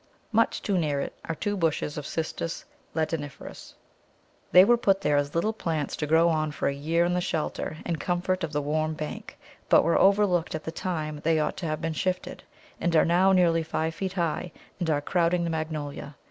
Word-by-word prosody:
Much 225 Hz, +1 st, +2 dB
too 195 Hz, -3 st, +1 dB
near 150 Hz, -4 st, 0 dB
it -, -, -4 dB
are 165 Hz, -, -3 dB
two 205 Hz, +5 st, -2 dB
bushes 160 Hz, -4 st, -1 dB
of 150 Hz, -1 st, -5 dB
Cistus 165 Hz, +1 st, -4 dB, 0.3 s
ladaniferus. 155 Hz, -3 st, -4 dB, 0.8 s
They 180 Hz, +1 st, +9 dB
were 240 Hz, -, +5 dB
put 195 Hz, -4 st, +2 dB
there 150 Hz, -6 st, +2 dB
as 145 Hz, +1 st, 0 dB
little 215 Hz, +7 st, +1 dB
plants 160 Hz, -8 st, -2 dB
to 150 Hz, -, -2 dB
grow 165 Hz, +2 st, +4 dB
on 155 Hz, -2 st, +1 dB
for -, -, -2 dB
a 140 Hz, -, +1 dB
year 160 Hz, +5 st, +1 dB
in 175 Hz, -, 0 dB
the 180 Hz, -, +1 dB
shelter 160 Hz, -1 st, -3 dB
and 165 Hz, -3 st, -2 dB
comfort 180 Hz, +2 st, -1 dB
of 160 Hz, -, -2 dB
the 145 Hz, -1 st, -1 dB
warm 155 Hz, +2 st, -1 dB
bank, 155 Hz, 0 st, -7 dB, 0.3 s
but -, -, +6 dB
were 170 Hz, -, +3 dB
overlooked 195 Hz, -5 st, +3 dB
at 155 Hz, -, -5 dB
the 160 Hz, -, -4 dB
time 155 Hz, -4 st, -3 dB
they 160 Hz, +1 st, +2 dB
ought 155 Hz, -, -1 dB
to 175 Hz, -, -3 dB
have 155 Hz, 0 st, -2 dB
been 165 Hz, 0 st, -2 dB
shifted, 185 Hz, +3 st, -2 dB, 0.4 s
and 175 Hz, -1 st, 0 dB
are 155 Hz, -, +5 dB
now 180 Hz, +3 st, +4 dB
nearly 170 Hz, -3 st, +4 dB
five 160 Hz, 0 st, -2 dB
feet 190 Hz, +3 st, -4 dB
high, 170 Hz, -1 st, -2 dB, 0.3 s
and 175 Hz, -3 st, -1 dB
are 145 Hz, -2 st, +1 dB
crowding 170 Hz, +2 st, +1 dB
the 170 Hz, -, -1 dB
Magnolia. 155 Hz, -3 st, -4 dB
165 Hz, 205 wpm, -27 LUFS, 155-180 Hz, 0.8 s, They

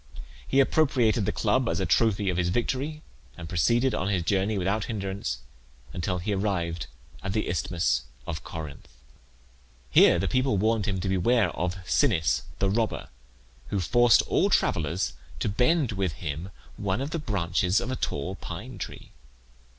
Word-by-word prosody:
He 135 Hz, -, +2 dB
appropriated 130 Hz, -7 st, +3 dB
the -, -, +2 dB
club 130 Hz, -2 st, +1 dB
as -, -, -1 dB
a 95 Hz, -, 0 dB
trophy 100 Hz, +2 st, +2 dB
of 90 Hz, -, -3 dB
his 90 Hz, -1 st, +1 dB
victory, 135 Hz, -, -2 dB, 0.3 s
and 85 Hz, -1 st, -7 dB
proceeded 115 Hz, +9 st, +2 dB
on 95 Hz, -3 st, -1 dB
his 95 Hz, -4 st, 0 dB
journey 100 Hz, +4 st, +1 dB
without 100 Hz, +3 st, 0 dB
hinderance 100 Hz, -, -3 dB, 0.5 s
until 90 Hz, +1 st, -1 dB
he 95 Hz, +4 st, -2 dB
arrived 85 Hz, -7 st, -1 dB, 0.3 s
at 95 Hz, 0 st, -3 dB
the 110 Hz, -, 0 dB
Isthmus 80 Hz, -7 st, 0 dB, 0.2 s
of 80 Hz, -2 st, -5 dB
Corinth. 75 Hz, -4 st, -7 dB, 1.0 s
Here -, -, +7 dB
the -, -, 0 dB
people 130 Hz, -4 st, +1 dB
warned 110 Hz, +2 st, +1 dB
him 95 Hz, -2 st, -1 dB
to 95 Hz, -, -2 dB
beware 100 Hz, +5 st, +2 dB
of 90 Hz, +1 st, -2 dB
Sinnis 80 Hz, -, +2 dB, 0.2 s
the 100 Hz, -, +1 dB
robber, 110 Hz, +1 st, -1 dB, 0.6 s
who 100 Hz, -, -1 dB
forced 120 Hz, +6 st, +5 dB
all -, -, +2 dB
travellers 85 Hz, +2 st, +1 dB, 0.3 s
to -, -, -1 dB
bend 125 Hz, +6 st, +2 dB
with 95 Hz, -5 st, -1 dB
him 80 Hz, +3 st, -5 dB, 0.3 s
one 100 Hz, +1 st, -1 dB
of 140 Hz, +3 st, -3 dB
the 165 Hz, -, -2 dB
branches 95 Hz, -, +1 dB
of 125 Hz, -, -3 dB
a -, -, -1 dB
tall 85 Hz, -, -3 dB
pine 100 Hz, +5 st, -8 dB
tree. -, -, -7 dB
95 Hz, 160 wpm, -27 LUFS, 90-115 Hz, 1.0 s, Here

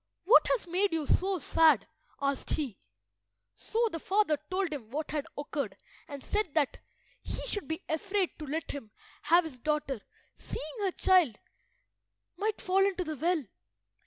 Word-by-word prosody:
"What 415 Hz, +8 st, +7 dB
has -, -, +1 dB
made 365 Hz, +2 st, +1 dB
you 320 Hz, -2 st, 0 dB
so 380 Hz, +6 st, +2 dB
sad?" 310 Hz, -, +4 dB, 0.3 s
asked 275 Hz, -1 st, -1 dB
he. 265 Hz, -10 st, -2 dB, 0.7 s
So 460 Hz, +1 st, 0 dB
the 330 Hz, -, -4 dB
father 385 Hz, -4 st, +2 dB
told 370 Hz, -3 st, 0 dB
him 240 Hz, -7 st, -7 dB
what 295 Hz, +4 st, -3 dB
had 295 Hz, -2 st, -2 dB
occurred, 280 Hz, -8 st, -3 dB, 0.3 s
and 285 Hz, -2 st, -8 dB
said 415 Hz, -8 st, -1 dB
that 290 Hz, -4 st, +1 dB, 0.4 s
he -, -, -4 dB
should 410 Hz, -, -3 dB
be 320 Hz, 0 st, -3 dB
afraid 380 Hz, +4 st, 0 dB
to 305 Hz, -, -6 dB
let 310 Hz, +3 st, -3 dB
him 275 Hz, -7 st, -7 dB, 0.3 s
have 340 Hz, +4 st, +5 dB
his 290 Hz, -6 st, -8 dB
daughter 290 Hz, -4 st, -1 dB, 0.3 s
seeing 310 Hz, +11 st, -6 dB
her 395 Hz, -2 st, +1 dB
child 360 Hz, -, +4 dB, 1.0 s
might 425 Hz, +1 st, -1 dB
fall 380 Hz, +1 st, +3 dB
into 385 Hz, -2 st, +1 dB
the 310 Hz, -2 st, -4 dB
well. 320 Hz, 0 st, +1 dB
320 Hz, 160 wpm, -30 LUFS, 285-380 Hz, 1.0 s, What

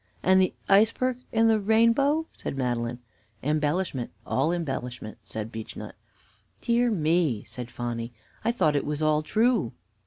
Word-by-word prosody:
"And 190 Hz, 0 st, +5 dB
the 185 Hz, -, +2 dB, 0.2 s
iceberg 230 Hz, +5 st, +3 dB
and 225 Hz, 0 st, +4 dB
the 220 Hz, -1 st, +4 dB
rainbow?" 230 Hz, +9 st, +3 dB
said -, -, -5 dB
Madeline. 120 Hz, -2 st, -1 dB, 0.5 s
"Embellishment, 150 Hz, -1 st, 0 dB, 0.2 s
all 135 Hz, +6 st, +1 dB
embellishment," 130 Hz, -9 st, -4 dB
said 110 Hz, 0 st, -6 dB
Beechnut. 110 Hz, -1 st, -7 dB, 0.7 s
"Dear 240 Hz, -, +2 dB
me!" 160 Hz, -, +1 dB
said 125 Hz, -1 st, -8 dB
Phonny, 120 Hz, 0 st, -4 dB, 0.3 s
"I 230 Hz, -, +2 dB
thought 155 Hz, -11 st, +2 dB
it 145 Hz, -, +1 dB
was 150 Hz, +1 st, -2 dB
all 155 Hz, 0 st, +3 dB
true." 220 Hz, -, +1 dB
155 Hz, 135 wpm, -27 LUFS, -, 0.7 s, And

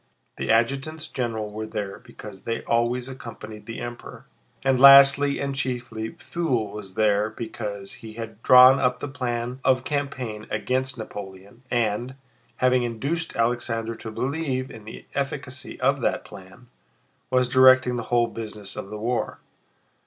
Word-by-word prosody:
The -, -, -4 dB
adjutants 140 Hz, +7 st, +1 dB
general 115 Hz, -6 st, -3 dB
were 110 Hz, +1 st, -5 dB
there 105 Hz, -3 st, -5 dB
because 100 Hz, -3 st, -12 dB
they 115 Hz, -, -3 dB
always 120 Hz, +2 st, 0 dB
accompanied 115 Hz, -4 st, -9 dB
the 115 Hz, -, -6 dB
Emperor, 120 Hz, 0 st, -8 dB, 0.4 s
and 135 Hz, -2 st, +2 dB
lastly 140 Hz, +1 st, +8 dB
and 140 Hz, 0 st, -2 dB
chiefly 125 Hz, -5 st, -3 dB
Pfuel 130 Hz, -12 st, -2 dB
was 100 Hz, -3 st, -9 dB
there 105 Hz, 0 st, +2 dB
because 110 Hz, -3 st, -6 dB
he 110 Hz, -1 st, -11 dB
had 115 Hz, -1 st, -8 dB
drawn 130 Hz, +2 st, +8 dB
up 125 Hz, -2 st, +1 dB
the 135 Hz, -, -5 dB
plan 125 Hz, -2 st, -3 dB
of 130 Hz, -1 st, +3 dB
campaign 130 Hz, -7 st, -3 dB
against 130 Hz, 0 st, -1 dB
Napoleon 100 Hz, 0 st, -9 dB
and, 120 Hz, +2 st, -1 dB, 0.4 s
having 125 Hz, 0 st, +3 dB
induced 135 Hz, +8 st, -3 dB
Alexander 115 Hz, -1 st, 0 dB
to 110 Hz, 0 st, -8 dB
believe 130 Hz, +2 st, -2 dB
in 110 Hz, -2 st, -11 dB
the 110 Hz, -, -10 dB
efficacy 135 Hz, -2 st, -4 dB
of 135 Hz, +1 st, +2 dB
that -, -, -1 dB
plan, 95 Hz, +6 st, -13 dB, 0.6 s
was 125 Hz, -1 st, +2 dB
directing 130 Hz, -1 st, +5 dB
the 120 Hz, -, -3 dB
whole 120 Hz, -1 st, +3 dB
business 105 Hz, -3 st, -7 dB
of 100 Hz, -, -6 dB
the 105 Hz, -, -6 dB
war. 115 Hz, +3 st, -2 dB
120 Hz, 145 wpm, -24 LUFS, 110-130 Hz, 0.6 s, lastly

